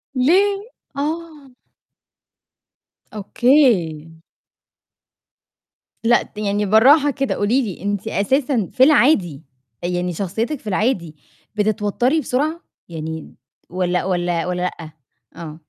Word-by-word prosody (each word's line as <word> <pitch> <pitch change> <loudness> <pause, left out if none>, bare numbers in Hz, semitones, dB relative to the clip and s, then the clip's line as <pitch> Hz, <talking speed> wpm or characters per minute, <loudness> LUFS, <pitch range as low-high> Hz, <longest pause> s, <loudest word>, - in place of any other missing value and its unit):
ليه؟ 395 - +2 0.3
آه. 305 -1 -5 1.6
أوكي. 210 - +2 2.0
لأ، 240 +1 +4
ت - - -22
يعني 205 0 -1
براحة 270 +9 +5
كده، 275 0 -2
قولي 225 +7 +1
لي 195 -7 -6
أنتِ 205 +1 -3
أساسًا 245 +1 0
في 260 - +4
العادي، 235 - +3 0.4
يعني 180 0 -2
شخصيتِك 220 - -3
في 225 - -15
العادي 190 -6 -1 0.4
بتتوتري 215 +7 0
بسرعة، 305 +5 -2 0.3
يعني 160 -1 -7 0.3
والّا 180 0 -1
والّا 175 -2 -1
والّا 180 0 -2
لأ؟ 170 -3 -5 0.4
آه. 160 -2 -9
210 Hz, 100 wpm, -20 LUFS, 180-275 Hz, 2.0 s, براحة